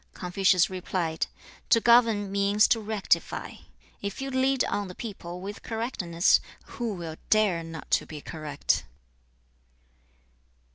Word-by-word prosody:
Confucius 185 0 +3
replied, 180 -3 -2 0.4
'To 230 - +6
govern 230 -4 +4
means 200 +1 +3
to 230 - +3
rectify. 215 -2 -1 0.4
If 200 -1 -4
you 270 0 -4
lead 260 0 +2
on 205 -1 -2
the 180 - -9
people 180 -5 -7
with 200 +2 -7
correctness, 210 -7 +1 0.3
who 235 -5 -4
will 165 -3 -6
dare 210 -6 +3
not 165 -1 -9
to - - +2
be 155 - -7
correct?' 150 -2 -2
200 Hz, 125 wpm, -27 LUFS, 175-225 Hz, 0.4 s, To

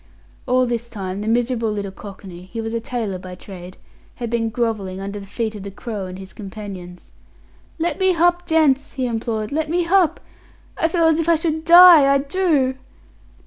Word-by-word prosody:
All 255 0 +3
this 235 -1 -3
time 195 -3 -5
the 210 - -5
miserable 230 -1 0
little 200 -2 -4
cockney 190 -2 -11
he 230 - -5
was 225 0 -4
a 230 - 0
tailor 225 -5 -4
by 180 0 -9
trade 185 -1 -11 0.4
had 235 -2 -5
been 230 -1 0
grovelling 215 -5 -2
under 200 +1 -5
the 195 - -11
feet 220 +2 -3
of 210 - -8
the 200 - -6
Crow 200 -1 -6
and 185 0 -8
his 190 0 -11
companions. 195 -4 -9 0.7
"Let 335 -1 -2
me 375 -1 +3
h'up, 350 +1 +2
gents" 300 -5 +2
he 260 -2 -2
implored 225 -2 -3
"let 310 +1 -1
me 345 +1 +1
h'up. 360 -1 +3 0.6
I 325 - +1
feel 335 0 +1
as 320 0 +3
if 330 0 0
I 335 - +6
should 315 0 -2
die 340 -5 +9
I 275 - +5
do." 280 -3 0
235 Hz, 190 wpm, -21 LUFS, 200-315 Hz, 0.7 s, die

